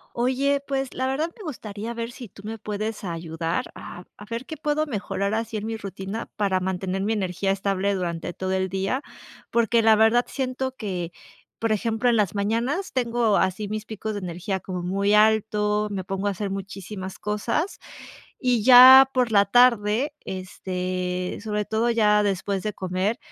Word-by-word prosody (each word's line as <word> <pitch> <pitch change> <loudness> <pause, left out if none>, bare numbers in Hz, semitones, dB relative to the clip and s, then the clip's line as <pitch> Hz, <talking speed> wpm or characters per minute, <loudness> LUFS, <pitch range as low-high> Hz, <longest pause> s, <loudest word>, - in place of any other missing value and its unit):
Oye, 265 +3 +1
pues 270 -1 -2
la 260 - -2
verdad 290 +5 -1
me 420 - -10
gustaría 225 - -6
ver 230 0 -4
si 245 -1 -10
tú 195 - -15
me 225 +1 -5
puedes 215 +1 -4
ayudar 165 -1 -3
a 180 - -9
a 205 - -11
ver 230 +2 -4
qué 315 - -7
puedo 300 +1 0
mejorar 205 -4 -2
así 225 0 -2
en 215 0 -4
mi 225 0 -3
rutina 195 +2 -6
para 200 -3 +1
mantener 190 +1 -2
mi 215 - 0
energía 195 -2 -1
estable 195 0 0
durante 175 -2 -3
todo 185 +1 -4
el 190 0 0
día. 195 +8 -1 0.5
Porque 235 0 +3
la 220 0 +6
verdad 225 +3 +4
siento 260 0 -3
que, 180 -8 -4 0.5
por 225 - 0
ejemplo, 225 +3 +1
en 235 - +4
las 205 -4 +1
mañanas 235 - -1
tengo 235 -4 +1
así 190 +2 0
mis 215 +1 -4
picos 220 0 -5
de - - -3
energía 180 +2 -3
como 180 -1 -5
muy 200 +3 +1
alto, 210 -1 +3
me 195 -2 -3
pongo 195 +2 -3
a - - +2
hacer 195 +1 -4
muchísimas 195 0 -6
cosas. 230 - -2 0.6
Y 245 -5 +1
ya 260 +2 +10
por 250 -2 +1
la 200 -2 +5
tarde, 240 +4 +3
este, 185 -1 -4
sobre 210 -1 -2
todo 225 +2 +1
ya 210 -2 +4
después 195 -1 -1
de 210 -1 -2
comer, 190 +5 -2
210 Hz, 175 wpm, -24 LUFS, 190-235 Hz, 0.6 s, ya